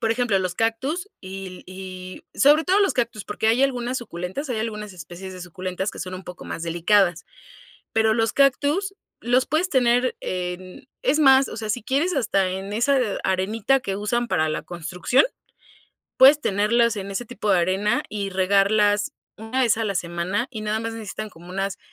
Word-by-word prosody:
por 225 Hz, -, +1 dB
ejemplo, 230 Hz, -4 st, +1 dB
los 185 Hz, -1 st, -2 dB
cactus, 265 Hz, -, -1 dB
y 190 Hz, -1 st, -8 dB
y 185 Hz, 0 st, -9 dB
sobre 295 Hz, +3 st, +6 dB
todo 385 Hz, +3 st, +3 dB
los 390 Hz, -, +2 dB
cactus, 235 Hz, -4 st, -2 dB
porque 210 Hz, +1 st, -3 dB
hay 240 Hz, +4 st, +3 dB
algunas 250 Hz, -1 st, 0 dB
suculentas, 190 Hz, -, -5 dB
hay 235 Hz, -, -1 dB
algunas 210 Hz, -2 st, -4 dB
especies 180 Hz, +2 st, -9 dB
de 185 Hz, -, -9 dB
suculentas 185 Hz, +2 st, -4 dB
que -, -, -8 dB
son 185 Hz, 0 st, -5 dB
un 185 Hz, 0 st, -8 dB
poco 180 Hz, 0 st, -9 dB
más 165 Hz, -, -5 dB
delicadas, 175 Hz, +1 st, +2 dB, 0.7 s
pero 220 Hz, 0 st, +3 dB
los 225 Hz, 0 st, +1 dB
cactus 290 Hz, +8 st, +2 dB, 0.3 s
los 250 Hz, +2 st, +3 dB
puedes 320 Hz, +5 st, +1 dB
tener, 245 Hz, -1 st, +2 dB
eh, 180 Hz, -1 st, -3 dB
en 185 Hz, +9 st, -13 dB
es 300 Hz, +3 st, +2 dB
más, 270 Hz, -2 st, +6 dB
o -, -, -7 dB
sea, 215 Hz, -1 st, -4 dB
si 240 Hz, +3 st, -2 dB
quieres 285 Hz, -, 0 dB
hasta 195 Hz, -7 st, +1 dB
en, 190 Hz, +2 st, -5 dB
eh, -, -, -2 dB
esa 275 Hz, +3 st, +3 dB, 0.3 s
arenita 215 Hz, +7 st, +1 dB
que 195 Hz, -5 st, -3 dB
usan 235 Hz, +4 st, -1 dB
para 155 Hz, -4 st, +1 dB
la 155 Hz, -, -2 dB
construcción, 175 Hz, -, +1 dB, 0.9 s
puedes 280 Hz, +3 st, +8 dB
tenerlas 225 Hz, 0 st, +2 dB
en 195 Hz, -1 st, -5 dB
ese 240 Hz, +5 st, -3 dB
tipo 215 Hz, -3 st, -3 dB
de 185 Hz, -, +4 dB
arena, 195 Hz, +6 st, +1 dB
y 200 Hz, -2 st, -3 dB
regarlas 200 Hz, +2 st, +2 dB, 0.2 s
1 225 Hz, +5 st, -3 dB
vez 230 Hz, -3 st, +3 dB
a 225 Hz, -, -1 dB
la 200 Hz, -2 st, -1 dB
semana, 180 Hz, +6 st, -2 dB
y 220 Hz, -4 st, -6 dB
nada 215 Hz, +1 st, -1 dB
más 230 Hz, 0 st, -4 dB
necesitan 215 Hz, -1 st, -6 dB
como 175 Hz, +1 st, -14 dB
unas 195 Hz, +1 st, -3 dB
210 Hz, 190 wpm, -23 LUFS, 185-245 Hz, 0.9 s, puedes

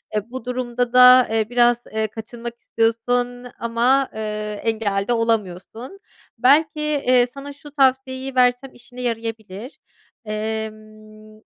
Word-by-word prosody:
Eee, 210 Hz, +2 st, -2 dB
bu 255 Hz, -1 st, -8 dB
durumda 245 Hz, -1 st, -2 dB
da, 250 Hz, 0 st, +8 dB
ııı, 220 Hz, 0 st, 0 dB
biraz, 240 Hz, -1 st, +4 dB, 0.2 s
eee, 220 Hz, 0 st, 0 dB
kaçınmak 230 Hz, +2 st, -8 dB
istiyorsun 245 Hz, +2 st, -1 dB
ama, 240 Hz, +4 st, +1 dB
ııı, 220 Hz, -, -6 dB, 0.3 s
engel 205 Hz, -3 st, -2 dB
de 245 Hz, -, +2 dB
olamıyorsun. 230 Hz, -, -3 dB, 0.4 s
Belki, 300 Hz, +3 st, +2 dB
ııı, 250 Hz, -1 st, +5 dB
sana 280 Hz, +1 st, -8 dB
şu 290 Hz, +1 st, -14 dB
tavsiyeyi 265 Hz, -1 st, 0 dB
versem 250 Hz, +1 st, +2 dB
işine 245 Hz, +1 st, -12 dB
yarayabilir. 225 Hz, -1 st, -5 dB, 0.5 s
Emm, 215 Hz, 0 st, -7 dB
240 Hz, 120 wpm, -21 LUFS, 220-255 Hz, 0.5 s, da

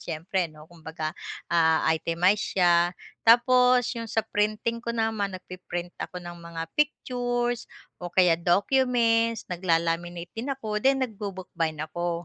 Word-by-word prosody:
siyempre, 170 Hz, +2 st, -2 dB
ano, 155 Hz, 0 st, -14 dB
kumbaga 160 Hz, -1 st, -6 dB, 0.4 s
ah, 160 Hz, -1 st, +3 dB
itemize 175 Hz, +6 st, +1 dB
siya 175 Hz, -1 st, +4 dB, 0.3 s
tapos 250 Hz, +1 st, +5 dB
yung 230 Hz, -1 st, -5 dB
sa 225 Hz, -1 st, 0 dB
printing 215 Hz, +2 st, -1 dB
ko -, -, -5 dB
naman 220 Hz, -3 st, -1 dB
nag 180 Hz, -, -16 dB
pi-print 175 Hz, -1 st, -6 dB
ako -, -, -5 dB
ng 175 Hz, 0 st, -8 dB
mga 170 Hz, -1 st, -6 dB
pictures 245 Hz, -4 st, -1 dB, 0.4 s
o 175 Hz, -, -4 dB
kaya 180 Hz, -3 st, +5 dB
documents 230 Hz, +3 st, +2 dB
nagla-laminate 170 Hz, 0 st, -1 dB
din 235 Hz, +5 st, -4 dB
ako 215 Hz, -5 st, -3 dB
din 270 Hz, +2 st, +3 dB
nagbubookbind 185 Hz, -, -4 dB
ako. 175 Hz, 0 st, -3 dB
190 Hz, 130 wpm, -26 LUFS, 170-230 Hz, 0.4 s, tapos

